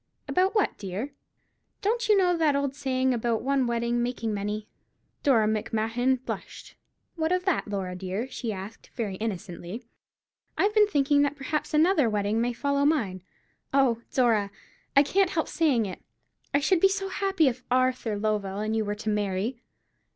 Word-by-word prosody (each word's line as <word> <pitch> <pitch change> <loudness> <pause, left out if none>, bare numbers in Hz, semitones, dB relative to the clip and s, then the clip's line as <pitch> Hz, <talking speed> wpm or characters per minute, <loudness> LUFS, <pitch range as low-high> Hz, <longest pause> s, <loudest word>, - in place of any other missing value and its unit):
"About 375 +4 +2
what, 420 - +1
dear?" 200 +8 -4 0.7
"Don't 465 +3 0
you 420 - +6
know 360 -2 +3
that 315 -4 +2
old 280 -1 0
saying 260 -2 0
about 235 -1 -1
one 270 -1 +1
wedding 235 0 0
making 235 -2 -2
many?" 210 +1 -3 0.5
Dora 230 -6 +4
Macmahon 225 +4 0
blushed. - - -7 0.4
"What 320 +1 0
of 365 0 +1
that, 380 - +1
Laura 190 -3 -3
dear?" 190 +6 -3
she 250 -3 -4
asked, 195 +2 -8
very 220 -6 -2
innocently. 190 0 -5 0.7
"I've 415 +2 +2
been 425 -1 +5
thinking 285 -5 +3
that 285 0 +1
perhaps 285 +2 -3
another 310 -4 +4
wedding 210 +1 0
may 245 +1 +1
follow 280 +3 0
mine. 225 - +1 0.5
Oh, 250 -4 +3
Dora, 225 -6 +2 0.5
I 280 - +9
can't 380 +5 +2
help 325 -2 -1
saying 275 -9 +2
it, 185 - -7 0.5
I 285 - +3
should 365 +4 +3
be 390 - +5
so 390 0 -2
happy 385 -5 +1
if 255 -1 -1
Arthur 255 -4 +1
Lovell 205 -2 -1
and 215 +1 -1
you 220 - +1
were 205 0 -2
to 215 +1 -4
marry." 210 +3 -1
245 Hz, 165 wpm, -27 LUFS, 215-295 Hz, 0.7 s, I